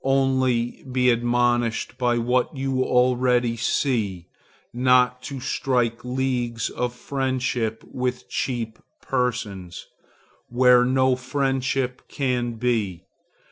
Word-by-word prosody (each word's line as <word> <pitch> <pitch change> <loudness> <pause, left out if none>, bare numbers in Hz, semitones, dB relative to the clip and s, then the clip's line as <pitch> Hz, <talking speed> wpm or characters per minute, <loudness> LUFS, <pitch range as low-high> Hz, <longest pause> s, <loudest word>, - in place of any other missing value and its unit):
Only 130 -3 +1
be 125 -1 +3
admonished 120 0 0
by 120 -1 +2
what 125 +4 0
you 135 -1 -1
already 125 -1 +2
see, 110 - -1 0.5
not 125 0 +3
to 135 +1 -6
strike 125 -3 -1
leagues 125 -2 -1
of 125 0 -3
friendship 125 -4 -2
with 125 0 -4
cheap 115 -4 -3 0.2
persons, 110 -9 -3 0.6
where 125 0 +5
no 130 0 +3
friendship 130 -1 -1
can 125 -3 -1
be. 110 -7 -1
125 Hz, 100 wpm, -24 LUFS, 120-130 Hz, 0.6 s, where